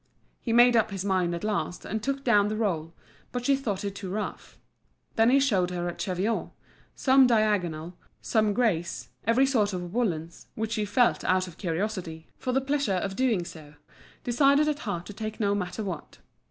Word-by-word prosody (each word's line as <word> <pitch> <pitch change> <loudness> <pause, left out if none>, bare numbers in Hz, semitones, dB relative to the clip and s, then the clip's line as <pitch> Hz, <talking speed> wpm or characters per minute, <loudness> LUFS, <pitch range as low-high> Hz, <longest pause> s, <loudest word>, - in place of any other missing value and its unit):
He 235 - -3
made 240 +1 +6
up 220 -1 +3
his 195 -1 -4
mind 185 -3 +1
at 170 - -6
last, 210 -4 -2
and 220 +2 -3
took 275 +3 -2
down 210 -4 +4
the 215 - -2
roll, 170 -8 -1 0.4
but 245 -1 -4
she 275 - +4
thought 215 -8 -3
it 200 - -3
too 195 -1 -7
rough. 205 +3 -5 0.6
Then 225 +1 +4
he 275 +2 +5
showed 200 -10 +2
her 175 -1 -3
a 175 - -3
cheviot, 190 +6 -1 0.5
some 265 -1 +5
diagonal, 185 -8 +1 0.2
some 215 -2 +1
greys, 200 -8 0 0.2
every 240 +4 +4
sort 220 -7 +1
of 180 0 -5
woollens, 170 -9 -2
which 220 0 -3
she 215 -2 0
felt 230 +4 +2
out 185 0 +2
of 170 - -13
curiosity, 175 -2 -3
for 255 - -2
the 265 +2 +2
pleasure 280 -5 0
of 195 +1 -2
doing 230 -8 +1
so, 155 -4 -11 0.5
decided 280 +4 +4
at 295 -1 0
heart 175 -3 -3
to 205 - -8
take 215 +1 -6
no 200 -2 +2
matter 205 +2 -3
what. 175 -7 -6
210 Hz, 190 wpm, -27 LUFS, 180-240 Hz, 0.6 s, made